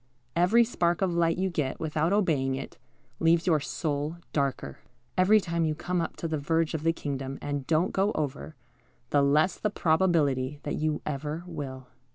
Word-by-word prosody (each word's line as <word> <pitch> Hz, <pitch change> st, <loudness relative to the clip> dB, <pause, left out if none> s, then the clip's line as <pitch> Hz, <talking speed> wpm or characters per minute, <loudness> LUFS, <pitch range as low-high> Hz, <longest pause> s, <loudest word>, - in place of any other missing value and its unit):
_ -, -, -41 dB, 0.3 s
Every 185 Hz, +8 st, +5 dB
spark 175 Hz, -7 st, 0 dB
of 180 Hz, -2 st, +1 dB
light 170 Hz, 0 st, +2 dB
you 190 Hz, 0 st, 0 dB
get 145 Hz, -6 st, -2 dB
without 160 Hz, +1 st, 0 dB
obeying 155 Hz, -10 st, +2 dB
it, 135 Hz, -, -7 dB, 0.4 s
leaves 165 Hz, 0 st, +3 dB
your 165 Hz, -4 st, +3 dB
soul 150 Hz, +2 st, -3 dB, 0.2 s
darker. 140 Hz, -3 st, -2 dB, 0.4 s
Every 195 Hz, +4 st, +5 dB
time 170 Hz, -3 st, -1 dB
you 155 Hz, -1 st, 0 dB
come 180 Hz, +3 st, -1 dB
up 165 Hz, -, -4 dB
to 165 Hz, -, -4 dB
the 155 Hz, -2 st, -2 dB
verge 165 Hz, +3 st, 0 dB
of 160 Hz, -, -2 dB
the 165 Hz, +1 st, +3 dB
kingdom 135 Hz, -4 st, -4 dB
and 145 Hz, -2 st, -4 dB
don't 165 Hz, +3 st, +2 dB
go 195 Hz, +2 st, +2 dB
over, 150 Hz, +1 st, -4 dB, 0.6 s
the 145 Hz, -, +4 dB
less 150 Hz, +6 st, +3 dB
the 210 Hz, -, 0 dB
probability 155 Hz, -7 st, +1 dB
that 145 Hz, -, -3 dB
you 155 Hz, -1 st, -1 dB
ever 150 Hz, +3 st, -3 dB
will. 140 Hz, -6 st, -6 dB
160 Hz, 185 wpm, -28 LUFS, 145-175 Hz, 0.6 s, Every